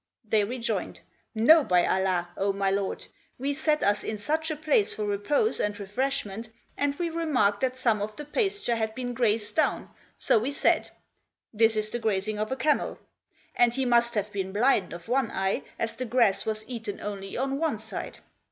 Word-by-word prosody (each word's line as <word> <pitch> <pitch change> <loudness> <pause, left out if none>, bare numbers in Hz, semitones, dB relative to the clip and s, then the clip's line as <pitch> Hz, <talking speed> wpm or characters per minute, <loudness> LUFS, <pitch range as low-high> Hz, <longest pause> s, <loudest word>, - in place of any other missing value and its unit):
They 215 -1 +3
rejoined, 235 +3 -3 0.2
" - - -47
No, 315 -1 +9
by 180 -7 +3
Allah, 185 -2 +1
O 200 +1 +1
my 195 0 0
lord. 195 0 -2 0.3
We 275 +3 -1
sat 305 +1 +1
us 205 +1 +2
in 215 - -3
such 315 +9 -1
a 310 - -1
place 295 -9 +1
for 210 - -2
repose 205 - +1
and 205 0 -1
refreshment 220 0 -3 0.3
and 285 0 0
we 340 +2 -2
remarked 270 -12 +1
that 260 -1 0
some 230 -5 +1
of 215 +1 -4
the 295 - -7
pasture 390 - 0
had 220 -1 -2
been 245 -1 -3
grazed 225 -3 0
down, 315 - +1 0.3
so - - +3
we 260 +6 -2
said: - - +2 0.6
This 225 +1 +4
is 215 0 0
the 240 - -2
grazing 210 -1 -1
of 215 +3 -2
a - - +1
camel; 300 +3 0 0.6
and 240 -1 +3
he 265 0 0
must 235 -1 +3
have 210 0 -1
been 190 -2 -3
blind 210 -2 +2
of 170 0 -9
one 250 -1 +1
eye 190 0 -1 0.2
as 225 0 -2
the 255 - -4
grass 230 -5 +2
was 215 0 -3
eaten 225 -5 -5
only 195 -1 -5
on 270 +2 -1
one 315 -8 0
side. 220 +1 -6
225 Hz, 195 wpm, -27 LUFS, 205-270 Hz, 0.6 s, No